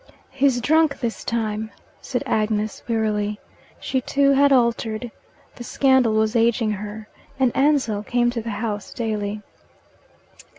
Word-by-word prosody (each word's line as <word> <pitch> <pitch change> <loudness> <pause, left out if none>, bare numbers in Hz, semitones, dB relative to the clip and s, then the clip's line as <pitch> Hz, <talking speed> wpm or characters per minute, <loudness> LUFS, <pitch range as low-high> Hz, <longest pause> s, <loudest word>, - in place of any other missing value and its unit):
"He's 270 -2 +2
drunk 315 +2 +2
this 235 -2 -3
time," 220 -2 -2 0.3
said - - -3
Agnes 215 -1 -1
wearily. 210 -2 -1 0.4
She 260 - -1
too 275 +2 +2
had 280 +1 +4
altered: 235 -2 +1 0.5
the 240 - -7
scandal 260 -2 +3
was 220 +1 +1
ageing 230 -1 +2
her, 210 +1 -6 0.3
and 255 -3 +2
Ansell 270 -7 +2
came 240 +2 +1
to 235 -1 -3
the 230 - -6 0.2
house 205 -2 -5
daily. 210 -2 -3
230 Hz, 130 wpm, -22 LUFS, 215-260 Hz, 0.5 s, had